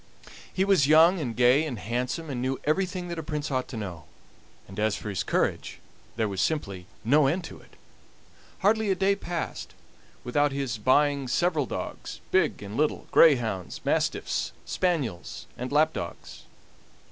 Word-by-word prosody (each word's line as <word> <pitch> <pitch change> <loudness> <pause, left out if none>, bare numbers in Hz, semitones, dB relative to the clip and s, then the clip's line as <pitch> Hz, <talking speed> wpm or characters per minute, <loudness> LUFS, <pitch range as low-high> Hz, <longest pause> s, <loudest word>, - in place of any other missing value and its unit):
He 190 - +1
was 190 -9 +4
young, 165 +4 +6
and 120 -7 -3
gay, 125 +4 +4
and 140 -7 -4
handsome, 125 - -3
and 125 -2 -3
knew 130 +1 -1
everything 180 +3 -1
that 170 -1 -4
a - - -2
prince 150 -1 -4
ought 130 -1 -1
to 130 - -7
know; 90 -6 -6 0.6
and 95 +2 -8
as 110 -1 +1
for 105 - -6
his 95 -2 -2
courage, - - -1 0.4
there 110 -1 0
was 95 -2 -2
simply 100 - -2 0.2
no 140 +5 +4
end 175 +6 0
to - - -9
it. - - -20 0.9
Hardly 220 +1 +2
a 190 - +3
day 195 +2 +2
passed 175 -4 -5 0.5
without 145 +4 +1
his 135 -5 -3
buying 140 +3 +2
several 155 0 +1
dogs - - -6
big 170 - +2
and 100 +1 -7
little, 150 +3 0
greyhounds, 115 - +3
mastiffs, - - 0
spaniels, 145 - -2
and 125 +2 -5
lapdogs. 150 - -1
140 Hz, 160 wpm, -27 LUFS, 115-165 Hz, 0.9 s, young